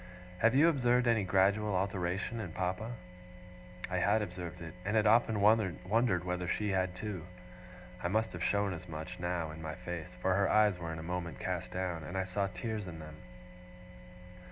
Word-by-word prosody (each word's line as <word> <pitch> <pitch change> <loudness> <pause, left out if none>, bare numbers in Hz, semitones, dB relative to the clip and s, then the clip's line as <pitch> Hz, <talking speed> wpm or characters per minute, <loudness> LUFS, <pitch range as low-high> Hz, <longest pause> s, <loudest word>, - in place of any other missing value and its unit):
Have 115 +4 +4
you 150 +5 +7
observed 125 -5 +3
any 115 -3 +3
gradual 100 +2 +3
alteration 95 +3 -1
in 90 -7 -5
Papa?' 95 +7 -2 0.9
I 90 0 -2
had 105 +4 +3
observed 90 -2 -6
it, 80 -1 -7
and 105 +3 -1
had 110 -1 +4
often 110 0 +4
wondered 100 -1 +3
whether 90 0 -2
she 105 +4 0
had 95 -1 0
too. 95 -5 -5 0.7
I 90 - 0
must 110 +4 +1
have - - -4
shown 100 -1 +1
as 90 +1 -8
much, 80 +2 -6
now, 85 -2 -2
in 80 +1 -9
my 80 -1 -4
face; 85 -3 -6
for 95 +9 +2
her 100 0 +3
eyes 105 -4 +4
were 85 -1 -4
in 80 - -5
a 80 - -6
moment 85 -4 -4
cast - - -3
down, 90 -3 -2
and 90 - -5
I 95 - +1
saw 100 +2 -1
tears 110 0 -4
in 85 -2 -7
them. 75 -1 -9
95 Hz, 185 wpm, -33 LUFS, 90-105 Hz, 0.9 s, you